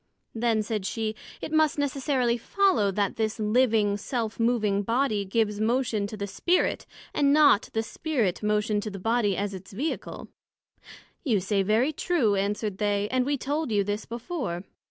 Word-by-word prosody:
Then, 225 -1 +1
said 210 -2 -3
she, 220 -1 -2 0.3
it - - -5
must 315 0 +3
necessarily 270 -3 +1
follow, 360 - +2
that 200 0 -1
this 220 0 -1
living, 215 -2 +2
Self 225 +1 -3
moving 220 -4 +2
Body 230 -1 0
gives 210 +1 0
motion 230 -2 +1
to 215 - -8
the 200 - -3
Spirit, 345 - 0 0.3
and 280 -1 +3
not 290 -7 +5
the 225 - 0
Spirit 235 - -1
motion 210 0 +1
to 215 - -4
the 195 - -7
Body, 215 -1 +1
as 200 0 -2
its 190 +1 -10
Vehicle. 285 +11 -4 1.0
You 235 - +2
say 195 +2 0
very 220 +9 +2
true, 290 - +1
answered 200 0 -1
they, 205 -1 0
and 255 0 +1
we 285 0 +1
told 290 +1 -2
you 205 -2 +2
this 205 +2 -3
before. 235 - -4
220 Hz, 165 wpm, -27 LUFS, 205-260 Hz, 1.0 s, not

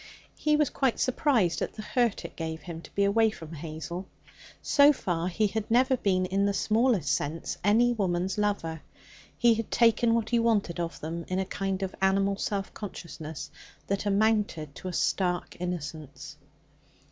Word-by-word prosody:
He 300 0 +2
was 300 -2 +2
quite 265 -4 0
surprised 245 - +2
at - - -2
the 215 - -6
hurt 240 -2 0
it - - -8
gave 160 -1 -4
him 165 -1 -7
to - - -15
be 200 - +3
away 220 +3 +4
from 165 -6 -9
Hazel. 165 +4 -6 0.5
So 285 0 +6
far 175 - -2
he 185 +4 +1
had 215 +1 -2
never 255 +3 +4
been, 185 -6 +1
in 195 +2 +1
the 200 - 0
smallest 220 - +2
sense, 155 +3 -3
any 230 +5 +4
woman's 185 -3 -1
lover. 165 -6 -1 0.6
He 240 -1 +5
had 225 -1 -3
taken 230 0 +4
what 225 -1 -1
he 235 - +4
wanted 210 -7 +1
of 170 0 -3
them 165 +2 -4
in 185 - -2
a 190 - 0
kind 195 0 -2
of 190 - -3
animal 195 +1 +3
semi 200 -1 -2
consciousness 160 -6 -7 0.3
that 200 +1 -2
amounted 205 -7 +1
to 185 - -8
a 180 - -4
stark 180 0 0
innocence. 150 -4 -6
195 Hz, 170 wpm, -28 LUFS, 170-225 Hz, 0.6 s, So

